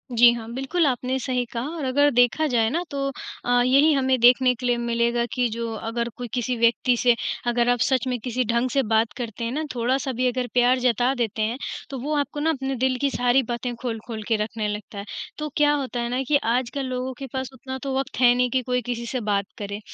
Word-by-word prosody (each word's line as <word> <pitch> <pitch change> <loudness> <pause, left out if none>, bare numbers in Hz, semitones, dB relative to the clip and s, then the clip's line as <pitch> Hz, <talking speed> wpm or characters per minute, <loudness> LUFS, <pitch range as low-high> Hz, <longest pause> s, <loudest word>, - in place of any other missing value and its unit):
जी 240 +1 +8
हाँ, 225 -2 -6
बिल्कुल 270 +6 0
आपने 255 0 -1
सही 250 -1 -1
कहा 235 0 -2
और 310 - -4
अगर 285 +3 +3
देखा 245 +5 +3
जाए 230 -5 +2
ना 335 +8 -1
तो 280 - -3 0.5
अ, 245 0 +3
यही 275 +5 +5
हमें 260 -2 +2
देखने 250 +2 +6
के 250 - -7
लिए 245 -1 +2
मिलेगा 235 0 0
कि, 250 -1 +1
जो 230 0 -4
अगर 230 +2 -3
कोई 245 - -5
किसी 250 0 -1
व्यक्ति 235 +2 +3
से 240 0 +4 0.3
अगर 240 0 +2
आप 245 0 +2
सच 260 +1 +2
में 250 -1 0
किसी 250 +2 -1
ढंग 235 +2 +1
से 275 +2 +1
बात 220 0 +1
करते 235 -1 -5
हैं 230 - -2
ना, 305 +4 -2
थोड़ा-सा 260 +3 0
भी 255 - +3
अगर 250 0 -1
प्यार 250 +1 +4
जता 245 +1 +2
देते 225 -3 -2
हैं, 225 +3 0 0.3
तो 270 - -5
वो 290 +5 -3
आपको 290 +1 -2
ना 310 +2 +1
अपने 270 -3 -1
दिल 260 +1 +1
की 280 - +2
सारी 245 +2 +2
बातें 240 +1 -3
खोल-खोल 225 -2 -5
के 225 - +2
रखने 215 -1 -3
लगता 210 0 -6
है। 200 - -6 0.3
तो 300 0 -4
क्या 295 -1 +4
होता 265 -4 -2
है 235 - -2
ना, 250 +2 -1
कि 290 - +4
आजकल 250 +4 -1
लोगों 255 0 -3
के 270 - -5
पास 260 -1 -3
उतना 260 +1 -7
तो 275 -1 -2
वक़्त 270 - -3
है 245 -1 +7
नहीं 250 0 +2
कि 260 +2 +1
कोई 250 0 0
किसी 240 +2 -3
बात 205 -3 0
करें, 205 0 -5
245 Hz, 235 wpm, -24 LUFS, 235-260 Hz, 0.5 s, जी